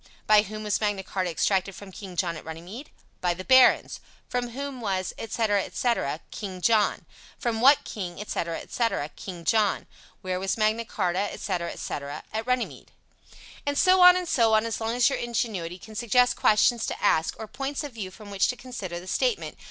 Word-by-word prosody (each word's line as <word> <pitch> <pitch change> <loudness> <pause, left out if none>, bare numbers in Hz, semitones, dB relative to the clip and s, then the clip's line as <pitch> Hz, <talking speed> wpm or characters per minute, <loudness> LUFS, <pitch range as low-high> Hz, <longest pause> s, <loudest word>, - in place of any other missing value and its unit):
"By 215 -1 +6
whom 215 +1 -7
was 210 0 0
Magna 205 -2 0
Charta 185 -1 -2
exacted 190 +3 0
from 200 -2 -10
King 190 -2 -9
John 170 -2 0
at 155 - -9
Runnymede?" 175 - -8 0.3
"By 175 -1 +1
the 185 - -7
barons." 260 +3 +5 0.3
"From 245 -1 -2
whom 270 +1 -6
was," 190 -4 -2
etc., 220 -2 0
etc.? 190 - -1
"King 190 -4 -6
John." 215 +2 +2 0.3
"From 235 -4 -2
what 275 +3 +6
king," 180 -4 -6
etc., 170 -5 -3
etc.? 230 -11 -1
"King 175 -3 -8
John." 210 +2 +2 0.4
"Where 185 -1 -2
was 190 +2 -1
Magna 220 +1 +1
Charta," 190 -1 -1
etc., 175 -3 -3
etc.? 140 0 -5
"At 220 +2 -3
Runnymede." 250 -1 -2 0.7
And 285 0 -1
so 370 0 +5
on 360 0 +10
and 365 -1 -2
so 230 -7 +3
on, 215 +1 +3
as 225 -1 -3
long 225 +1 -1
as 245 -1 +4
your 275 - 0
ingenuity 215 -7 -2
can 215 +3 -13
suggest 245 +2 +3
questions 220 +2 +3
to - - -4
ask, 160 -5 +2
or 220 - -6
points 270 +6 -4
of 290 -3 -7
view 210 -5 -5
from 205 +2 -12
which 200 0 +2
to 250 - -1
consider 245 -9 -6
the 175 - -12
statement. 470 - -1
215 Hz, 190 wpm, -26 LUFS, 185-240 Hz, 0.7 s, on